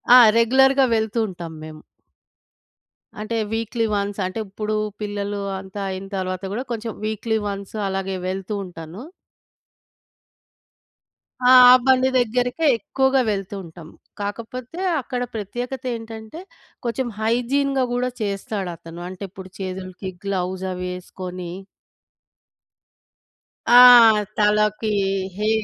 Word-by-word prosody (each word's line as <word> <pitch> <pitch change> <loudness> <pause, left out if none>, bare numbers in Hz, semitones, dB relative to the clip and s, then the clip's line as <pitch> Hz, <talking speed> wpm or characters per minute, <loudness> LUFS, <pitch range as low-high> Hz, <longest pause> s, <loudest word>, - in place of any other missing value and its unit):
ఆ! - - +11 0.2
రెగ్యులర్‌గా 265 +3 +5
వెళ్తూ 220 +1 -1
ఉంటాం 170 -4 -8
మేం. 155 0 -9 1.5
అంటే, 230 +2 -3 0.2
వీక్‌లీ 225 +1 -1
వన్స్ 200 0 -2
అంటే 185 +5 -4
ఇప్పుడు 210 +2 -3 0.3
పిల్లలు 205 -1 -3 0.2
అంతా 190 +1 -8
అయిన 190 +1 -5
తరువాత 185 0 -3
గూడా 245 - -2
కొంచెం 225 -1 -4
వీక్‌లీ 220 +1 -1
వన్స్ 200 +1 -6
అలాగే 195 0 -2
వెళ్తూ 190 +2 -4
ఉంటాను. 175 +4 -9 2.4
ఆ! 250 0 +5 0.2
ఆ - - +10
బండి 260 0 +4
దగ్గరికే 245 +6 0
ఎక్కువగా 265 +5 +1
వెళ్తూ 195 -1 -4
ఉంటాం. 165 -1 -12 0.3
కాకపోతే 230 - -6 0.2
అక్కడ 250 0 -4
ప్రత్యేకతేంటంటే, 230 - -5 0.4
కొంచెం 240 +2 -1
హైజీన్‌గా 260 +4 +1
గూడా 250 +1 0
చేస్తాడతను. 190 -5 -4
అంటే 185 +2 -8
ఇప్పుడు 190 0 -11
చేతులకి 185 0 -6
గ్లౌస్ 190 -1 -2
అవేసుకొని 180 0 -6 2.2
ఆ! - - +8 0.6
తలకి 210 +1 +2 0.5
హె 210 +2 0
210 Hz, 100 wpm, -22 LUFS, 190-240 Hz, 2.4 s, ఆ